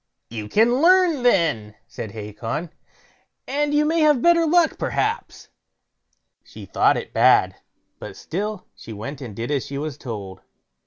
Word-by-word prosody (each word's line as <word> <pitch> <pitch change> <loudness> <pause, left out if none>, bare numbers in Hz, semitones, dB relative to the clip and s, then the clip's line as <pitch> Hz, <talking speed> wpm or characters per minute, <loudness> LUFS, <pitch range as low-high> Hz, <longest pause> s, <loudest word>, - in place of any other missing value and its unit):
"You 105 -2 -6
can 240 - +3
learn 355 -4 +4
then", 150 - +1
said 110 - -7
Hacon, 115 - -5 0.8
"and 290 +2 -1
you 295 +1 +2
may 325 +2 +1
have 300 -4 +4
better 335 +3 +4
luck, 335 0 +2
perhaps." 440 +2 -3 0.9
She - - -12
thought - - +2
it - - -7
bad, - - +4 0.4
but - - -9
still 210 -1 -5
she 115 - -11
went 120 +7 -7
and 115 -6 -8
did 115 +6 -4
as 140 -3 -1
she 140 - -6
was 150 -1 -5
told. 100 -7 -7
170 Hz, 150 wpm, -22 LUFS, -, 0.9 s, learn